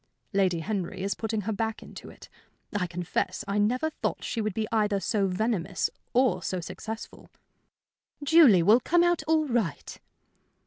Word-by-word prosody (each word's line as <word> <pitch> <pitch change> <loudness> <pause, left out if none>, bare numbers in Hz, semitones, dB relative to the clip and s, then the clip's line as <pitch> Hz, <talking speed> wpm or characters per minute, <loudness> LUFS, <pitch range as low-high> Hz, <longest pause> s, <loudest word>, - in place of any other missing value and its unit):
"Lady 185 -4 +2
Henry 190 -1 -3
is 200 - 0
putting 220 -1 -3
her 215 +3 -3
back 220 +1 -3
into - - -11
it. - - -14 0.5
I 185 -3 0
confess 180 +3 -3
I 200 +1 0
never 250 +9 +1
thought - - -3
she 230 - -2
would 215 -3 -2
be 220 -1 -1
either 210 -3 +1
so 200 0 0
venomous 195 -1 -1 0.2
or 255 0 +2
so 185 - -2
successful." 220 +6 -8 0.9
"Julie 285 - +6
will 215 +7 +6
come 345 +7 +3
out 345 -1 +2
all 315 -1 +3
right." 230 - -2
215 Hz, 160 wpm, -27 LUFS, 190-240 Hz, 0.9 s, Julie